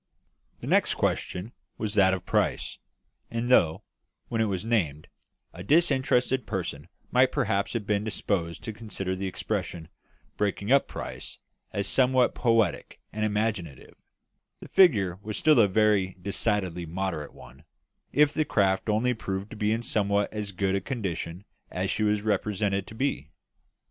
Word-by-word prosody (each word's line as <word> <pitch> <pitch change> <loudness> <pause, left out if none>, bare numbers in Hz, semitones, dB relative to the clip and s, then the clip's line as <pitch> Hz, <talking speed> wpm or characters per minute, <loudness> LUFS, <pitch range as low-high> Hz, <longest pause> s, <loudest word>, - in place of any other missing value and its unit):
The - - -6
next - - +2
question 90 +6 -2 0.3
was 105 -2 -3
that 95 -3 +5
of 90 -1 -8
price; - - 0 0.5
and 115 +1 -2
though, 80 -10 +4 0.5
when 115 -1 0
it - - +3
was 100 -1 -2
named, 85 -11 0 0.5
a 90 - -9
disinterested 130 - +2
person 90 -8 -4 0.2
might - - +4
perhaps 100 +2 0
have 115 -4 -2
been 105 0 0
disposed 95 -6 -2
to 110 - -5
consider 100 -4 -4
the 95 +1 -3
expression 85 -2 -4 0.5
"breaking 100 +2 -1
up 140 0 +5
price" - - -7 0.3
as 100 - -2
somewhat 130 -1 +3
poetic 115 -7 +1
and 110 +1 -2
imaginative, 105 - -2 0.7
the - - -11
figure 100 - +4
was 105 0 -4
still 155 -4 +5
a 105 - +6
very 100 -2 +2
decidedly 95 -3 -1
moderate 85 -3 -4
one, 70 +4 -15 0.5
if 150 0 +4
the 155 - +1
craft 100 -6 +1
only 115 +4 +2
proved 100 -3 -5
to - - -7
be 105 0 0
in 115 +2 -1
somewhat 100 -2 0
as 105 -2 -4
good 95 0 -1
condition 95 -6 -4 0.2
as - - -2
she - - -2
was 105 -1 +1
represented 100 -1 0
to 110 - -10
be. 110 - -2
105 Hz, 150 wpm, -27 LUFS, 95-115 Hz, 0.7 s, a